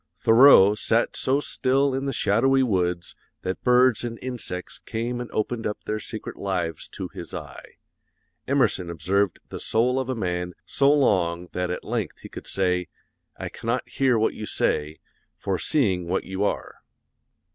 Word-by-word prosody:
Thoreau 115 -4 +7
sat 115 +2 +1
so 135 +2 +1
still 135 -1 +1
in 135 +1 -2
the 135 - -1
shadowy 135 +4 +3
woods 90 -6 -1 0.3
that 95 - -3
birds 125 -1 +4
and 115 -1 -4
insects 120 -8 -5
came 120 +2 -3
and 120 - -6
opened 115 +2 -2
up 105 - -5
their 110 0 -2
secret 110 0 -7
lives 90 -5 -3
to - - -7
his - - -8
eye. - - -9 0.7
Emerson 120 -10 +1
observed 90 +4 0
the - - -6
soul 125 +4 +1
of 130 -1 -3
a 130 - -1
man 90 -4 -3
so 140 0 +3
long 90 -11 +2
that 90 0 -2
at 90 - -4
length - - -3
he - - -10
could - - -9
say, 90 -2 0 0.5
'I - - -5
cannot - - -3
hear 130 -3 +2
what 110 - +1
you 105 - -6
say, 75 +1 0 0.4
for 95 -2 -2
seeing 95 - +1
what 95 +2 0
you 95 +1 -3
are.' 105 - -2
110 Hz, 165 wpm, -25 LUFS, 90-125 Hz, 0.7 s, Thoreau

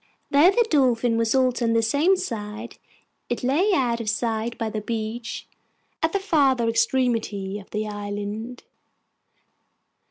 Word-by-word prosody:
Though 290 +5 +6
the 465 +4 +3
Dolphin 245 - +2
was 230 +1 +1
also 255 -2 +2
on 230 -1 +2
the 230 0 +2
same 300 - +3
side, 225 - -6 0.5
it 240 - -3
lay 310 +12 +2
out 240 -3 0
of 215 - -2
sight 225 +1 -2
by 225 - -2
the 215 - -3
beach 225 +2 -4 0.5
at 320 - +1
the 395 - +1
farther 275 -11 +2
extremity 230 -4 0
of 195 - -15
the 215 0 -3
island. 205 +3 -5
235 Hz, 140 wpm, -24 LUFS, 220-265 Hz, 0.5 s, Though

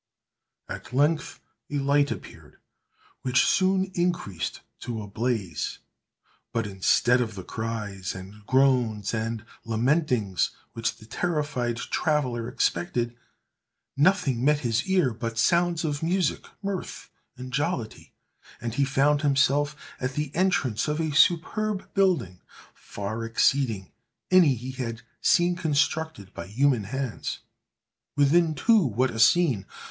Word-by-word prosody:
At - - -8
length 150 +4 +1 0.3
a 145 - -2
light 140 +1 +2
appeared, - - -9 0.6
which 130 -1 +3
soon 190 0 +2
increased 175 - -2 0.2
to 115 -2 -5
a 105 - -5
blaze; 105 -6 -2 0.7
but, 115 -1 -1
instead 105 +5 +3
of 110 -3 -3
the 95 - -7
cries, 105 -4 -4
and 95 +3 -10
groans, 125 -6 +2
and 110 0 -3 0.2
lamentings, 115 - +1 0.2
which 115 0 -2
the 110 - -15
terrified 145 -4 -1
traveller 125 -5 -1
expected, 120 -3 -1 0.8
nothing 140 -6 +2
met 150 +1 +3
his 120 +3 0
ear 180 -10 +2
but 115 0 -5
sounds 170 +4 +2
of 145 -2 -2
music, 180 +2 0 0.2
mirth, 195 -2 -5 0.3
and 125 0 -8
jollity; 145 -6 -2 0.5
and 115 -2 -4
he 140 +3 +2
found 140 +2 +2
himself 145 +1 +2 0.2
at 130 +1 -2
the 150 0 -3
entrance 155 - +1
of 150 +1 -1
a 160 -1 0
superb 190 +6 +2
building, 165 - +1 0.3
far 105 +3 -6
exceeding 115 -3 +1 0.4
any 175 -8 +6
he 125 +3 -6
had 115 -3 -5 0.2
seen 175 0 +3
constructed 155 - -1
by 85 - -7
human 120 +1 +2
hands. 130 +2 -4 0.7
Within, 155 +3 +3
too, 220 - +4
what 130 - +1
a 115 - -6
scene! 120 - +4
130 Hz, 125 wpm, -26 LUFS, 115-155 Hz, 0.8 s, any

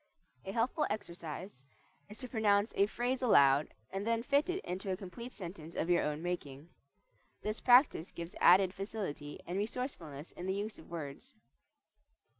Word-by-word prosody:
A 190 - -3
helpful 240 +8 +1
exercise 170 -6 -6 0.5
is 210 - -10
to 255 - -6
pronounce 210 -2 +2
a 200 - +4
phrase 245 +4 -1
aloud 140 - +5 0.2
and 195 +1 -3
then 230 0 +1
fit 285 +6 +2
it 365 +2 -2
into 190 +2 -4
a 185 - 0
complete 235 +6 -8
sentence 170 -5 -8
of 165 - 0
your 175 - +4
own 150 +2 -2
making. 160 -4 -4 0.7
This 215 +1 -3
practice 245 - +5
gives 170 +1 -7
added 185 +1 +7
facility 195 -8 -5
and 180 +3 -2
resourcefulness 190 - -4
in 180 - -7
the 190 - 0
use 210 +2 -4
of - - -14
words. 165 - -7
195 Hz, 160 wpm, -34 LUFS, 170-230 Hz, 0.7 s, added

